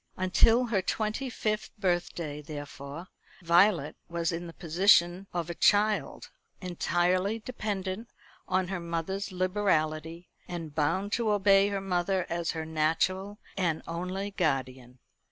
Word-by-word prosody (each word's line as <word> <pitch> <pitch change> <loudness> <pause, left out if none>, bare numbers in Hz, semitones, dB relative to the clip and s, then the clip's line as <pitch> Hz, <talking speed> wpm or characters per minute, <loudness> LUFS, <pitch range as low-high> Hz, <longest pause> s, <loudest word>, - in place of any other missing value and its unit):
Until 225 +6 +4
her 215 -5 +1
twenty 215 +7 -2
fifth 215 -3 -2
birthday, 175 -5 -1
therefore, 145 +2 -8 0.3
Violet 170 -2 +4
was 170 0 -1
in 170 +1 -4
the 165 - -9
position 175 +2 +3
of 170 -2 -2
a 170 - -4
child, 210 +4 +2 0.3
entirely 180 +2 0
dependent 215 -2 -4 0.4
on 185 -1 0
her 190 -2 -2
mother's 170 +4 -3
liberality, 175 -3 0 0.2
and 165 -4 -6
bound 165 +7 0
to 230 -1 +1
obey 200 -1 +5
her 200 -1 -2
mother 185 0 0
as 170 -1 -1
her 160 -1 -4
natural 165 +6 0 0.2
and 170 -5 0
only 185 +4 -3
guardian. 130 -8 -2
180 Hz, 125 wpm, -29 LUFS, 165-200 Hz, 0.4 s, obey